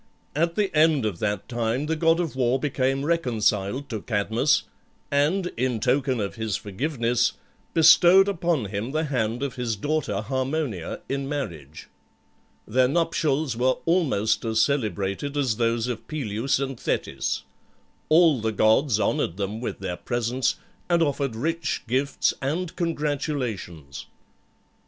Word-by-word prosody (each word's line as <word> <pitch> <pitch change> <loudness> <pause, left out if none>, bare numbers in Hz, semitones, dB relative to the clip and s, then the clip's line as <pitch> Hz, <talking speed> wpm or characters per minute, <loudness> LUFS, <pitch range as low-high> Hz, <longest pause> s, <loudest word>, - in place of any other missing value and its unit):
At 170 +2 +1
the 205 -5 0
end 155 -5 +4
of 100 -6 -2
that 105 -1 -2
time 120 +3 -1
the 160 +1 -1
god 165 +1 +3
of 165 -6 -2
war 125 0 +2
became 135 -1 0
reconciled 125 -6 0
to 110 -3 -4
Cadmus, 110 +6 +1 0.5
and, 165 +6 +1
in 125 -1 0
token 130 +2 +1
of 100 -2 -2
his 110 -2 -2
forgiveness, 120 +2 0 0.4
bestowed 175 +4 +7
upon 170 - 0
him 105 +6 -4
the 155 +1 +1
hand 120 -4 -1
of 140 -1 -4
his 120 -3 -1
daughter 145 -4 -1
Harmonia 130 - -3
in 135 0 -3
marriage. 85 - -5 0.8
Their 125 +3 +3
nuptials 155 -3 0
were 130 +2 +2
almost 150 - +1
as 110 -1 0
celebrated 110 - 0
as 130 -7 +1
those 115 -1 +1
of 120 -3 -5
Peleus 130 -4 -1
and 135 -2 -4
Thetis. - - -2 0.7
All 155 -5 +5
the 110 0 0
gods 110 +3 +3
honoured 85 - 0
them 105 +3 -3
with 120 - -5
their 90 -2 -3
presence, 120 +2 -1 0.3
and 170 -1 +4
offered 140 -5 -1
rich 160 +5 -2
gifts 135 +4 +1
and 165 +6 -2
congratulations. 135 - -3
130 Hz, 140 wpm, -25 LUFS, 110-150 Hz, 0.8 s, bestowed